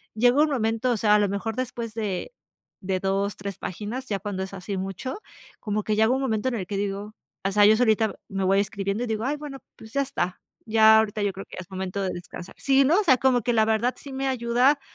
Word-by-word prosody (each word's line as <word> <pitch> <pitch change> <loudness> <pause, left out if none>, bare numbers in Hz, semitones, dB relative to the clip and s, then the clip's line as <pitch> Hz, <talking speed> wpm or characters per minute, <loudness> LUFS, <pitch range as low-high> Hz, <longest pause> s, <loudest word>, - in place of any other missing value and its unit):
llega 245 +6 +4
un 310 - +4
momento, 230 -1 0
o 230 - +1
sea, 210 0 +4
a - - +4
lo 205 -2 +2
mejor 205 +2 -3
después 240 -3 -4
de 210 - -3 0.5
de 190 0 -1
2, 195 +1 0
3 195 -1 -6
páginas, 220 +8 -5
ya 200 -2 -2
cuando 190 -1 -4
es 190 - -8
así 195 +1 -5
mucho, 195 - -4 0.4
como 210 -1 -2
que 215 0 0
llega 220 +1 +4
un 270 - -1
momento 225 -2 -1
en 250 - -3
el 190 -5 -3
que 200 - -3
digo, 200 +1 -3 0.3
o 195 - 0
sea, 205 +1 +5
yo 215 +1 +7
solita 220 -2 +2
me 195 -1 -2
voy 195 +1 +4
escribiendo 200 +2 -2
y - - -3
digo: 220 +1 -2
"Ay 290 +2 0
bueno, 290 -2 -7 0.2
pues, 220 0 -13
ya 280 - +2
está, 180 -9 -2 0.3
ya 220 0 +6
ahorita 215 -1 -1
yo 200 -1 0
creo 195 - -8
que - - -12
es 185 +1 -9
momento 190 +1 -4
de 190 - -1
descansar". 175 +1 -9
Sí, 275 0 +3
¿no?, 335 +8 +4
o - - -3
sea, 260 -8 +5
como 250 -1 +3
que 240 - 0
la 220 -1 +4
verdad 225 +3 +1
sí 275 -2 -9
me 270 0 -2
ayuda 250 +3 +2
220 Hz, 250 wpm, -25 LUFS, 195-245 Hz, 0.5 s, yo